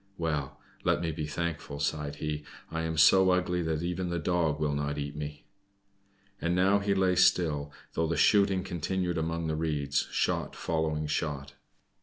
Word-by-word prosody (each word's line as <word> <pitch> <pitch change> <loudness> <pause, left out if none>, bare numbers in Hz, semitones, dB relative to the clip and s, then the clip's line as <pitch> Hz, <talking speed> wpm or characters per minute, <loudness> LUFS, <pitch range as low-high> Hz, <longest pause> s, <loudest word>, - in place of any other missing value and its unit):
"Well! 75 -4 -2 0.2
let - - +2
me 85 -1 -1
be 75 -1 -4
thankful," 75 -2 -4
sighed 75 0 -2
he. 75 0 -3 0.3
"I 80 0 -2
am 80 -1 -2
so 95 +4 +6
ugly 90 -1 +1
that 80 -1 -1
even 90 +1 -2
the 85 - -1
Dog 85 -3 0
will 75 -2 0
not 75 0 -2
eat 75 0 -4
me." 75 0 -6 1.0
And 85 +1 +1
now 95 +3 +4
he 100 0 0
lay 95 -1 +3
still, 75 -5 +3 0.2
though 80 0 0
the 85 0 -1
shooting 100 +2 +4
continued 90 -1 -2
among 80 +1 -2
the 80 -1 -1
reeds, 75 -3 0
shot - - -1
following 80 -2 -1
shot. 75 -2 -2
80 Hz, 170 wpm, -29 LUFS, 75-90 Hz, 1.0 s, so